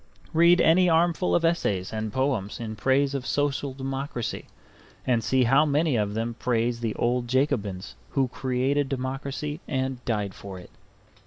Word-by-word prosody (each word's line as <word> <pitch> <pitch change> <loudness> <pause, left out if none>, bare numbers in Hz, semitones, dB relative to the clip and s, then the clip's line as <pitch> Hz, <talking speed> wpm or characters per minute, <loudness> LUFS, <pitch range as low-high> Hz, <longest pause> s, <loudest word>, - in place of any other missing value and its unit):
Read 170 +2 +6
any 175 +2 +5
armful 170 +2 +2
of 170 - +2
essays 105 - 0
and 110 -1 -3
poems 130 -5 -1
in 110 -2 -5
praise 135 +5 +2
of 135 -2 -2
social 145 -1 0
democracy, 135 -2 -4 0.6
and 120 -3 +1
see 130 +4 +2
how 135 +5 +5
many 150 -1 +1
of 105 -2 0
them 115 +1 -2
praise 120 0 0
the 115 -2 -2
old 120 0 0
Jacobins 105 -8 -1 0.2
who 135 -2 +1
created 130 +3 0
democracy 135 +4 -4
and 130 -2 -2
died 105 -5 -1
for 95 0 -9
it. 90 - -12
130 Hz, 155 wpm, -26 LUFS, 115-145 Hz, 0.6 s, Read